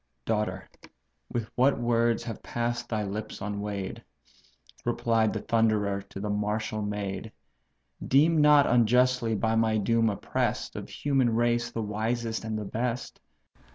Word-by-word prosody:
"Daughter! 105 -4 -1 0.9
what 135 +3 +3
words 120 -1 +2
have 115 -3 -6
pass'd 120 0 -3
thy 110 -2 -1
lips 105 +2 -5
unweigh'd! 100 -1 -4 0.8
(Replied 115 -2 +1
the 110 - -3
Thunderer 105 -3 +1
to 100 0 -10
the 105 - -3
martial 105 +1 -1
maid;) 105 0 -4 0.8
Deem 155 +4 +4
not 150 -1 +6
unjustly 125 0 +3
by 110 +2 0
my 110 -1 +2
doom 115 +2 +2
oppress'd, 100 - -2
Of - - -6
human 130 -5 +1
race 120 0 +1
the 115 -2 -3
wisest 110 +2 -2
and 110 -1 -3
the 105 - -4
best. 120 +4 -3
110 Hz, 130 wpm, -28 LUFS, 105-120 Hz, 0.9 s, not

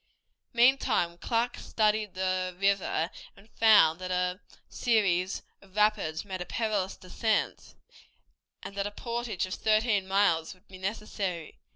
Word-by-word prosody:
Meantime 235 -8 +3
Clark 235 +3 -1
studied 215 -2 0
the 185 -1 -1
river 195 -4 +1 0.3
and 205 +3 -19
found 205 -7 +5
that 185 0 -5
a 180 0 0 0.3
series 195 -6 +1 0.2
of 195 -1 -20
rapids 210 -6 +1
made 190 -2 -5
a - - -3
perilous 210 -4 -1
descent, 215 +4 -2 0.9
and - - -7
that 200 0 -2
a - - -6
portage 235 -3 -3
of 185 - -6
thirteen 215 -2 +2
miles 190 -4 +2
would 185 +3 -29
be 190 -1 -12
necessary. 190 -4 -4
195 Hz, 135 wpm, -29 LUFS, 185-215 Hz, 0.9 s, found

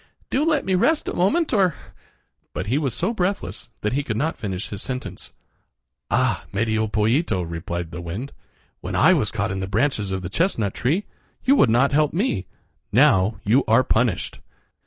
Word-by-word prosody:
Do 275 - +2
let 310 -3 +1
me 190 - 0
rest 295 - +2
a - - -2
moment, 285 - +1
or—" 185 -7 +3 0.8
But - - -2
he 130 +7 +1
was 140 -5 -1
so 190 +7 -1
breathless 190 - -2
that 105 +2 -1
he 140 - +1
could 110 -6 -3
not 155 +6 0
finish 95 -3 -4
his 100 - -5
sentence. 130 -1 -6 0.8
"Ah! - - +1
Medio 110 +1 0
Pollito," 110 - +1
replied 85 0 -5
the 85 -1 -6
wind, 95 +11 -6 0.5
"when - - -5
I - - +6
was - - +1
caught - - -2
in 95 - -3
the 95 - -3
branches 105 -1 0
of 95 -1 -3
the - - -3
chestnut 115 - 0
tree 160 +12 0 0.4
you 270 +2 +5
would 140 - +5
not 125 +5 +3
help 150 +1 +2
me. 170 - -1 0.4
Now 95 +4 +4
you 125 +6 +3
are 115 +4 +5
punished." 115 -5 0
120 Hz, 180 wpm, -23 LUFS, -, 0.8 s, I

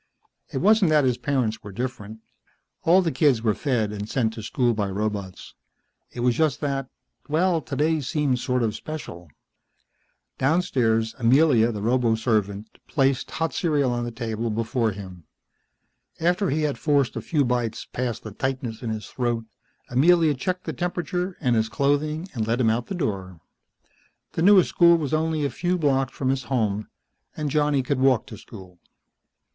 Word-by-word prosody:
It - - -3
wasn't 210 -1 +4
that 150 -2 +4
his 125 -2 +1
parents 125 -6 -1
were 105 - -9
different. 110 -1 -6 0.6
All 180 +3 +5
the 165 - 0
kids 130 -4 +2
were 110 -2 +3
fed 115 -5 -1
and 105 0 -6
sent 115 -4 0
to 110 - -7
school 120 +2 0
by 105 -3 -1
robots. 100 -2 -4 0.6
It 120 - -6
was 125 0 +3
just 155 -5 +1
that 135 -3 -2 0.4
well 165 +2 +2
today 155 +2 0
seemed 140 -2 0
sort 125 -1 0
of 110 -2 0
special. 115 - -8 1.1
Downstairs 125 -8 +1
Amelia, 120 -1 +4
the 105 -2 -5
roboservant, 110 -4 +1 0.2
placed 135 -3 +1
hot 165 0 -2
cereal 145 -7 +1
on 120 0 -1
the 120 - -3
table 115 -1 -3
before 115 +2 0
him. 95 -5 -9 0.9
After 180 +3 +1
he 155 +3 0
had 145 -2 -1
forced 140 -4 +1
a - - -3
few 150 -4 +1
bites 120 -2 -1
past 120 -3 -4
the 110 - -7
tightness 130 0 -3
in 120 - -4
his 110 -1 -4
throat, 120 -3 -2 0.5
Amelia 160 +4 +4
checked 180 +7 -3
the - - -4
temperature 180 +1 -3
and 125 -5 +1
his 110 0 +1
clothing 145 - 0
and 110 -4 -2
let 115 +2 0
him 115 -3 +3
out 120 +2 -2
the 195 - -4
door. 95 - -3 0.9
The - - -3
newest 190 0 +6
school 170 -1 +5
was 150 -4 -3
only 155 -1 0
a 140 - -1
few 180 +5 -1
blocks 135 -5 +1
from 130 - -2
his 130 -1 -1
home, 110 -5 -1 0.5
and 150 -2 -2
Johnny 145 -2 +2
could 135 +1 -1
walk 130 -3 +3
to 110 - -10
school. 95 -5 -13
130 Hz, 170 wpm, -24 LUFS, 110-150 Hz, 1.1 s, newest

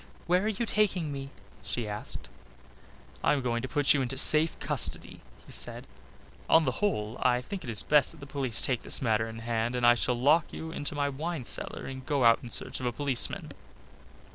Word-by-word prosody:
"Where 180 +2 +2
are - - 0
you 220 +2 -2
taking 195 -7 0
me?" 140 -1 -6 0.3
she 105 +3 -4
asked. 105 - -4 1.0
"I - - +3
am 140 -3 -2
going 120 -1 -1
to 130 - -5
put 145 0 +3
you 140 - 0
into 130 +1 -3
safe 155 +1 +6
custody," - - -2 0.3
he - - -15
said. - - +2 0.6
"On 160 -1 +5
the 130 - +1
whole 115 - -2
I 125 -1 +2
think 185 +9 -7
it 125 - -7
is 110 -3 +1
best 150 -3 +4
that 165 - -10
the 140 - -10
police 135 -4 0
take 125 -3 0
this - - +2
matter 110 -2 0
in 115 - -9
hand 115 +1 -1
and 125 -1 0
I 120 - +7
shall 120 0 0
lock 150 +6 +3
you 160 0 -7
into 145 -2 -5
my 145 -1 0
wine 150 0 -5
cellar - - -1
and 130 0 -7
go 140 -1 -1
out 115 0 +5
in 120 - -9
search - - -3
of 125 - -3
a - - 0
policeman." 135 0 -1
135 Hz, 215 wpm, -28 LUFS, 120-155 Hz, 1.0 s, I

